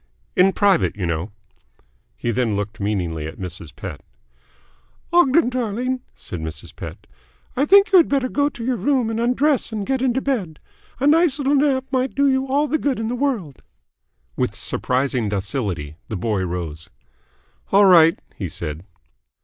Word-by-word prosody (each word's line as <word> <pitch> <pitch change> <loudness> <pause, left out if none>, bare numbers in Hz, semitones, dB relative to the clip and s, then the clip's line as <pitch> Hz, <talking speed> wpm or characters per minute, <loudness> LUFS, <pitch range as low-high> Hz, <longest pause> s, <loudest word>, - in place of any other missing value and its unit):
"In 185 +2 +5
private, 195 -3 +2
you 95 - -2
know." 85 +4 -2 0.9
He 120 - -1
then 115 -3 0
looked 105 +2 -4
meaningly 90 -7 -2
at 80 - -9
Mrs. 90 -4 -7
Pett. - - -7 1.1
"Ogden 335 -4 +5
darling," 250 +1 -2
said 90 - -7
Mrs. 80 0 -7
Pett, - - -9 0.5
"I 275 +4 +1
think 400 +4 +6
you 385 - +8
had 335 - +3
better 275 -2 +1
go 285 +3 +1
to 235 -5 -8
your 255 -1 0
room 245 +2 +1
and 225 - -2
undress 250 +3 +1
and 210 -2 -3
get 265 +1 -1
into 260 0 +1
bed. 215 - -2 0.4
A 270 - 0
little 310 +3 +6
nice 340 -6 +3
sleep 275 -1 +2
might 260 0 0
do 280 +1 +3
you 265 0 +1
all 285 +3 +1
the 310 +3 0
good 275 -5 -1
in 225 0 -2
the 245 - -1
world." 240 - -2 0.7
With - - -1
surprising 125 -3 -1
docility, 95 - -3
the 110 - -4
boy 100 0 -1
rose. 80 -3 -5 0.8
"All 200 +1 +6
right," 165 -3 +7 0.2
he - - -4
said. 75 +2 -6
215 Hz, 165 wpm, -21 LUFS, -, 1.1 s, you